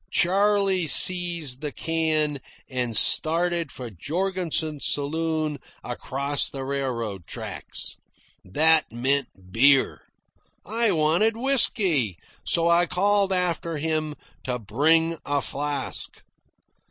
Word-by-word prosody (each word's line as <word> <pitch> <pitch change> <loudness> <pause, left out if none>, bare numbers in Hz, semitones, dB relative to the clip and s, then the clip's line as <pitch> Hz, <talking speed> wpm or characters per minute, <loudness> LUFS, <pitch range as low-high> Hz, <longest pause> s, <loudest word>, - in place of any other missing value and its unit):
Charley 195 -1 +2
seized 170 -6 +2
the 150 -1 -4
can 155 -3 -1 0.3
and 125 -4 -1
started 170 -1 +2
for 125 -3 -8
Jorgensen's 160 - -2
saloon 155 +1 -1 0.2
across 140 +3 -2
the 135 -1 -6
railroad 115 - -4
tracks. - - -6 0.5
That 155 - +2
meant 130 +3 0 0.2
beer. 135 +5 +3 0.6
I 225 +1 +1
wanted 170 +7 +2
whisky, 195 - +2 0.3
so 170 0 +2
I 170 +1 +3
called 200 +2 +2
after 175 -3 -1
him 155 0 -2 0.3
to 125 -1 -2
bring 160 +9 +1
a 145 0 0
flask. 145 +1 -1
155 Hz, 100 wpm, -24 LUFS, 140-175 Hz, 0.6 s, beer